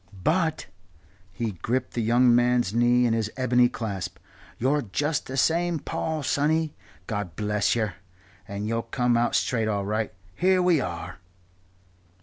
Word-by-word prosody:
"But" 160 -1 +1 0.7
he 110 +3 -3
gripped 125 +6 -1
the 120 - -1
young 120 +2 +4
man's 120 -3 +2
knee 120 +1 +4
in 115 - +2
his 110 -2 0
bony 125 -1 +3
clasp 100 -7 -5 0.4
"you're 140 +5 +1
just 145 +7 -2
the 130 - -5
same 170 +4 +2
Paul, 155 +1 -3
sonny, 155 +3 +1 0.3
God 105 - -4
bless 105 +1 +1
yer 110 -5 -1 0.5
and 100 +1 -4
you'll 115 +1 0
come 120 +1 0
out 120 +1 +2
straight 115 -3 +1
all 100 -2 -1
right. 105 +1 -1 0.2
Here 185 +1 +3
we 180 -3 +4
are." 85 -1 -5
120 Hz, 145 wpm, -26 LUFS, 110-145 Hz, 0.7 s, young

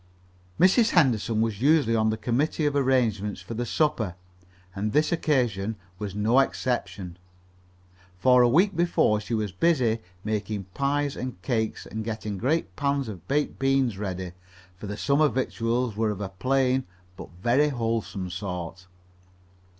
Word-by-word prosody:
Mrs. 215 +6 +5
Henderson 120 - +2
was 110 -2 -1
usually 140 -5 +4
on 110 -1 +2
the 110 - -1
committee 130 +8 0
of 145 -1 +1
arrangements 120 -7 +1
for - - -8
the 120 +2 -3
supper, 120 - 0 0.6
and 105 +2 -3
this 155 +1 +2
occasion 120 - 0 0.2
was 100 -2 -5
no 110 +5 +3
exception. 100 -9 -2 1.0
For 125 +6 +5
a 120 - +5
week 180 - +3
before 170 -10 +2
she 110 +2 -3
was 105 -3 -2
busy 120 - +2 0.2
making 105 -1 -2
pies 140 0 0
and 125 -6 -5
cakes 110 -3 -1
and 110 0 -5
getting 110 -3 -4
great 155 - 0
pans 140 -2 0
of 90 -4 -9
baked 145 +1 -1
beans 135 -6 +1
ready, 95 -3 -4 0.4
for 100 +3 -8
the 105 +1 -5
supper 145 +5 +3
victuals 120 -3 -1
were 110 0 +1
of 105 -2 -3
a 100 -2 -4
plain 130 +5 +1 0.3
but - - -9
very 135 +5 +3
wholesome 115 -7 -2
sort. 90 -1 -6
115 Hz, 150 wpm, -26 LUFS, 105-135 Hz, 1.0 s, Mrs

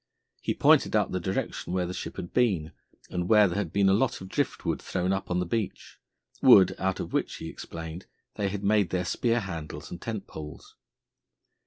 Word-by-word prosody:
He - - -1
pointed - - +4
out - - +2
the 95 - -1
direction 95 0 -3
where 90 -1 +1
the 90 - -4
ship - - -6
had 85 - -7
been, 95 -11 +2 0.4
and 90 0 -2
where 105 -2 +7
there 90 +2 -2
had 90 -6 -3
been 100 -1 +3
a 95 - +5
lot 115 +7 +1
of 95 - -9
drift - - -2
wood - - -1
thrown 90 +2 -1
up 95 - -3
on 90 - 0
the 90 - 0
beach 105 +3 -4 0.4
wood 95 - +8
out 95 0 -1
of - - -5
which, - - 0
he - - -7
explained, 80 +2 -8 0.3
they 100 -1 -1
had 100 +1 -5
made 100 -3 +3
their 90 0 -1
spear 115 +4 +1
handles 85 -6 -6
and 85 - -7
tent 110 -3 -4
poles. 75 -3 -10
95 Hz, 205 wpm, -28 LUFS, 90-100 Hz, 0.4 s, wood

